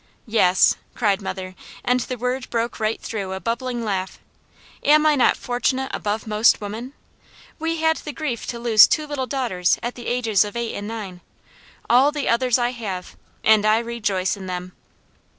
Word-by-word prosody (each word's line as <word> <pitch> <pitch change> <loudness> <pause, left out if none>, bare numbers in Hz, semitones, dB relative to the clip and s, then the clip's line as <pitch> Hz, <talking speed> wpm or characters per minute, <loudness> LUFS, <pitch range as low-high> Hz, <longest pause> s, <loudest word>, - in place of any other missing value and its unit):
"Yes!" 190 -6 +4 0.2
cried 205 -4 +1
mother, 185 -1 -5 0.3
and 250 +1 +3
the 250 +1 -4
word 250 +2 -3
broke 235 0 -2
right 220 0 -1
through 195 -4 -4
a 190 - -4
bubbling 235 +2 -3
laugh. 190 -3 -2 0.6
"Am 305 +1 +5
I 305 -1 +5
not 260 - +3
fortunate 255 +2 -1
above 210 +1 -2
most 215 +1 +3
women? 220 +6 -6 0.7
We 325 0 -2
had 320 0 +3
the 300 - -6
grief 260 -4 -4
to 240 - -4
lose 230 -2 +7
two 310 - 0
little 285 -3 -3
daughters 235 -11 0
at 240 +1 -2
the 240 - -9
ages 230 -5 +2
of 205 +1 -7
eight 235 -1 -2
and 205 0 -5
nine, 205 -5 -7 0.7
all 260 +5 +5
the 295 -2 -3
others 245 0 +3
I 240 0 0
have, 200 -7 -6 0.3
and 215 -1 +5
I 215 +1 +4
rejoice 215 -6 -1
in 190 -2 -9
them." 180 0 -5
235 Hz, 175 wpm, -22 LUFS, 205-255 Hz, 0.7 s, lose